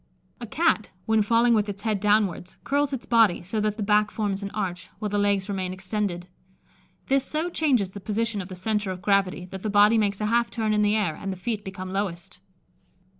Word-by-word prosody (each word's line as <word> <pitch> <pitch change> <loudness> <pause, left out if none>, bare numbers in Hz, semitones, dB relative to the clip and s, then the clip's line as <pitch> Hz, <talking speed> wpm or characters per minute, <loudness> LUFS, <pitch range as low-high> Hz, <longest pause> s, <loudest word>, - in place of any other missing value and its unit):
A 235 - -7
Cat, 310 -5 +1 0.2
when 220 -1 +3
falling 230 +3 +3
with 210 -2 +1
its 200 0 -6
head 215 -3 0
downwards, 205 -3 +1
curls 285 +1 +1
its 260 -3 -4
body, 225 -7 +3
so 210 +4 -2
that 210 0 -1
the 215 - -2
back 210 +1 +3
forms 205 -3 -2
an 200 - -4
arch, 185 -4 -4
while 210 - -3
the 205 0 0
legs 200 -1 +1
remain 190 -2 -3
extended. 185 -2 -3 0.8
This 270 0 +2
so 315 +5 -2
changes 255 - +1
the 200 - -8
position 215 +1 -2
of 185 - -9
the 185 - -7
centre 210 +2 -1
of 185 -1 -6
gravity, 195 -2 +1
that 190 -1 -7
the 215 - -2
body 210 +2 +5
makes 200 -2 0
a 210 - -1
half 235 +2 +2
turn 220 -2 -1
in 210 - +2
the 210 0 +3
air, 205 -7 +1
and 195 +3 -5
the 190 - -6
feet 210 +3 -3
become 185 -1 -7
lowest. 180 -3 -4
210 Hz, 220 wpm, -25 LUFS, 190-220 Hz, 0.8 s, body